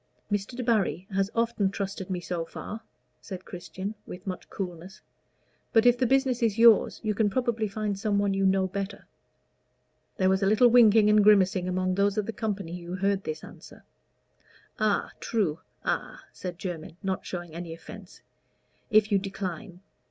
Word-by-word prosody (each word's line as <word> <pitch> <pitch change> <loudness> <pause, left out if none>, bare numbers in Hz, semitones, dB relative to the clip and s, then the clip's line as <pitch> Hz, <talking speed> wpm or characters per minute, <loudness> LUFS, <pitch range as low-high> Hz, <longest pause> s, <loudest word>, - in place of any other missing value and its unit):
"Mr. 205 +4 -2
Debarry 220 -7 0
has 195 0 +1
often 230 -4 +1
trusted 195 -1 -5
me 185 -1 -2
so 175 -1 -3
far," 215 +6 -7 0.4
said 190 -2 -8
Christian, 185 +3 -6
with 180 +3 -9
much 185 -2 -6
coolness; 185 +1 -6 0.7
"but 225 +1 +5
if 245 0 +7
the 250 0 +1
business 265 -1 +2
is 225 -2 +1
yours, 230 -2 +6
you 215 -1 0
can 210 0 +2
probably 235 -1 0
find 205 -1 -3
some 210 -1 0
one 200 -1 +1
you 195 0 0
know 190 0 +3
better." 195 +2 -5 1.1
There 185 - +2
was 190 +1 +2
a 195 - +2
little 215 +4 +5
winking 225 -3 +6
and 210 -1 +5
grimacing 190 -3 +4
among 185 0 0
those 200 +1 +1
of 210 - +1
the 225 - -4
company 195 -5 -4
who 175 +1 -6
heard 195 +1 0
this 155 0 -4
answer. - - -13 1.0
"A 215 -2 +1
true 185 -9 -1 0.2
a," - - -2 0.2
said 180 -2 -6
Jermyn, 170 -3 -6
not 190 -1 -2
showing 175 -3 -6
any 170 0 -6
offence; 190 +4 -11 0.7
"if 215 0 +4
you 200 - +4
decline. 190 -1 -6
195 Hz, 165 wpm, -27 LUFS, 185-215 Hz, 1.1 s, if